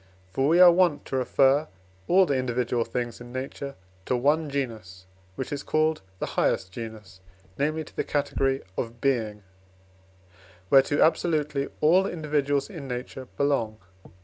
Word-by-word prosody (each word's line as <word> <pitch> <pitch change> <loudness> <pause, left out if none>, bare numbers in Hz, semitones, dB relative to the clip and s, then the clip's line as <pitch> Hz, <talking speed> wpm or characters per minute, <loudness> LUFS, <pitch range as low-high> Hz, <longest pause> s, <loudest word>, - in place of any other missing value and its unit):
For 135 +1 +1
we 165 +3 +4
are 180 -1 +10
wont 175 -4 +2
to - - -4
refer 135 +3 +3 0.4
all 190 +2 +5
the 145 - 0
individual 125 -2 0
things 120 0 -4
in 120 0 -10
nature 135 +2 -5 0.3
to 125 - +1
one 150 +4 +2
genus, 110 -10 -5 0.3
which 130 - -4
is 140 - -3
called 155 +1 +1 0.2
the - - -3
highest 95 - 0
genus, 110 -4 -9 0.4
namely, 155 +3 0
to - - -16
the - - -1
category 135 -2 0 0.2
of 115 -1 -4
Being, 110 -6 -1 1.3
whereto 135 +2 +5
absolutely 150 -4 +1
all 180 +5 +4
individuals 145 -4 -1
in 160 -9 -8
nature 125 +1 -6
belong. 135 -7 0
140 Hz, 145 wpm, -26 LUFS, 120-150 Hz, 1.3 s, are